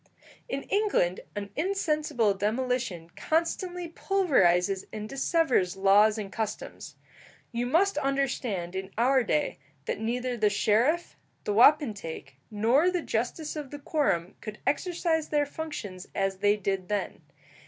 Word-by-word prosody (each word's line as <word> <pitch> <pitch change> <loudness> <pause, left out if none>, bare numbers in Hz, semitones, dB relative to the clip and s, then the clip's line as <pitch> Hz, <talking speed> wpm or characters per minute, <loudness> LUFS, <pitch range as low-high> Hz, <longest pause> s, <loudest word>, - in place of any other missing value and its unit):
In 275 +1 -3
England 400 - +1 0.2
an 200 -1 -5
insensible 305 - +1
demolition 210 -4 -2
constantly 350 +2 -1
pulverizes 195 - +2
and 215 0 -5
dissevers 270 - +1
laws 205 +3 +5
and 200 -3 -5
customs. 220 -2 -5 0.6
You 240 0 -2
must 340 +5 +2
understand 255 - -1
in 190 0 -4
our 255 +2 +4
day 150 -9 0 0.3
that - - -2
neither 245 +3 -2
the 210 -2 +3
sheriff, 225 +11 +1 0.3
the 205 - -1
wapentake, 210 - +2
nor 235 - +3
the 360 -2 -1
justice 245 +8 -2
of 295 -3 -5
the 290 - -7
quorum 275 - 0
could 215 -1 -7
exercise 330 -1 0
their 295 -1 +2
functions 255 - -6
as 195 -1 -1
they 205 +1 +3
did 195 -2 -2
then. 205 -1 -2
235 Hz, 130 wpm, -28 LUFS, 200-305 Hz, 0.6 s, laws